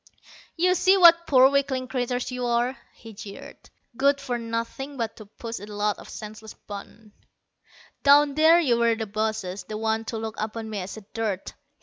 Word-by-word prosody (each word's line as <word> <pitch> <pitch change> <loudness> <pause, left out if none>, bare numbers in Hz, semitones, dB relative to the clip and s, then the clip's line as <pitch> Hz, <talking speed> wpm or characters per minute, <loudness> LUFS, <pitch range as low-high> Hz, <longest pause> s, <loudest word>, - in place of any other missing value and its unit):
"You 365 +2 +3
see 375 +2 +4
what 340 -2 +7
poor 260 -2 +7
weakling 270 -2 0
creatures 250 -1 -2
you 250 0 -4
are," 240 +2 +1 0.2
he 225 -2 -13
jeered. 200 0 -11 0.3
"Good 280 +2 +3
for 250 -4 -3
nothing 230 +5 -5
but 230 -2 -3
to 215 - -11
push 230 +2 -7
a 205 - -10
lot 210 0 -1
of - - -12
senseless 215 0 -9
buttons. 210 +1 -11 0.9
Down 285 0 +6
there 320 +3 +6
you 245 -8 +2
were 235 -1 +3
the 220 0 -4
bosses, 210 -2 -3
the 215 - -6
ones 220 0 -1
to 225 - -3
look 220 0 -5
upon 220 +1 -4
me 210 - -3
as 190 +3 -6 0.2
dirt. 215 -4 -3
230 Hz, 180 wpm, -25 LUFS, 215-275 Hz, 0.9 s, what